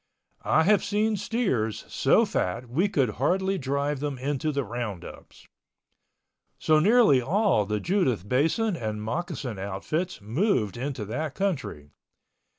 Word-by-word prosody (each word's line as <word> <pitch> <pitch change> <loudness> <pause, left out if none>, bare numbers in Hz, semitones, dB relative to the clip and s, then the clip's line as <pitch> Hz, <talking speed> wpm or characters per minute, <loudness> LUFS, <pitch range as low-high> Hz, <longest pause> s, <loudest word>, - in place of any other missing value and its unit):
I 160 - +3
have 200 +2 +3
seen 210 +2 +1
steers 190 - -1
so - - +3
fat 115 +7 -2
we 165 - +1
could 135 - +1
hardly 190 +5 +1
drive 140 +1 -1
them 145 -1 -3
into 145 +3 -2
the 140 -1 -1
roundups. 110 -5 -7 1.1
So 155 -1 +3
nearly 205 - +5
all 180 - +2
the 105 0 -1
Judith 130 - 0
Basin 165 - +1
and 110 -6 -4
Moccasin 145 - -4
outfits 100 - -3
moved 110 - 0
into 130 -3 -4
that 145 +8 -4
country. 135 - -3
140 Hz, 130 wpm, -26 LUFS, 115-185 Hz, 1.1 s, nearly